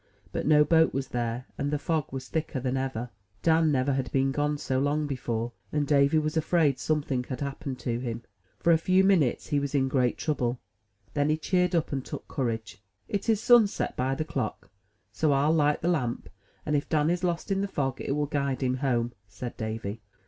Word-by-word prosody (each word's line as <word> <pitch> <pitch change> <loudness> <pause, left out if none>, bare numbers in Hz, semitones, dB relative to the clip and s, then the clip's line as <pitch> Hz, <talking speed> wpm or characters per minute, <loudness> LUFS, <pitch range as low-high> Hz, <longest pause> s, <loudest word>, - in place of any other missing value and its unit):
But - - -2
no 150 -1 +6
boat 160 -1 +3
was 135 -1 -2
there, 120 +1 -2
and 140 0 0
the 150 - 0
fog 155 0 -1
was 130 -1 -5
thicker 155 -3 -2
than 130 +1 -1
ever. 130 -3 -3 0.3
Dan 160 -1 +4
never 135 0 +1
had 130 -2 -2
been 135 0 +2
gone 145 +1 0
so 130 -2 -1
long 145 +2 +1
before, 120 -4 -2 0.2
and 150 -1 +1
Davy 140 +1 +4
was 155 0 0
afraid 160 -3 +2
something 140 -5 -1
had 130 0 -5
happened 140 -1 -4
to 120 -1 -1
him. 120 -2 -4 0.3
For 170 - +4
a 160 - +4
few 185 +3 +3
minutes 180 -10 +2
he 145 -2 +2
was 140 0 -3
in 135 -1 +3
great 130 -2 +1
trouble; 130 -6 -1 0.6
then 145 +1 +1
he 155 - +2
cheered 180 +2 +1
up, 165 -1 0
and 135 -2 -2
took - - -7
courage. 110 -7 -3 0.3
"It 205 +1 -2
is 220 -2 +2
sunset 235 -4 +4
by 130 +1 0
the 155 - -2
clock; 125 -8 -4 0.4
so 155 - +1
FU 140 +2 +3
light 150 -2 +2
the - - +1
lamp, 130 -9 -1 0.4
and, 150 - +1
if 145 - -1
Dan 155 +1 +2
is 175 +1 -1
lost 175 +2 -1
in 195 0 +1
the 200 - 0
fog, 135 -7 -2
it - - -1
will 150 0 0
guide 140 -2 -1
him 130 0 +1
home," 120 -3 0
said 100 +5 -7
Davy. 110 -1 -4
140 Hz, 210 wpm, -28 LUFS, 130-155 Hz, 0.6 s, no